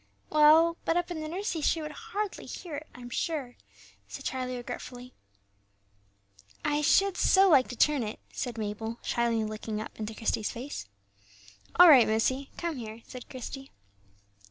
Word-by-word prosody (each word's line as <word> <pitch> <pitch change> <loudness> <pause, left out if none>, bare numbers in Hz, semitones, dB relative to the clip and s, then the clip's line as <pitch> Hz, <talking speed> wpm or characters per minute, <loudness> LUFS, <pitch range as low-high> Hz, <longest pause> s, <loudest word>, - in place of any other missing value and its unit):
"Well; 315 +2 +6
but 330 - +1
up 350 0 -1
in 320 -3 -4
the 310 - -4
nursery 355 0 -3
she 325 - +2
would 305 -1 -5
hardly 425 0 -5
hear 345 -4 -8
it, 300 - -8
I'm 245 -1 -10
sure," 280 -4 -2 0.5
said - - -9
Charlie, 255 -1 -3
regretfully. 245 +1 -8 1.5
"I 295 0 +1
should 390 +5 +4
so 385 0 +5
like 275 -6 +5
to 250 - -7
turn 295 +3 +3
it," 215 -1 -5
said 240 -2 -4
Mabel, 220 +2 -4
shyly 235 -2 0
looking 215 0 -4
up 215 - -6
into 215 0 -5
Christie's 220 -1 -1
face. 245 - -6 0.9
"All 355 - +9
right, 270 -7 +8
missie; 260 +5 0
come 340 -4 -3
here," 225 -1 -8
said 250 -1 -10
Christie. 270 +1 -7
265 Hz, 155 wpm, -29 LUFS, 230-325 Hz, 1.5 s, All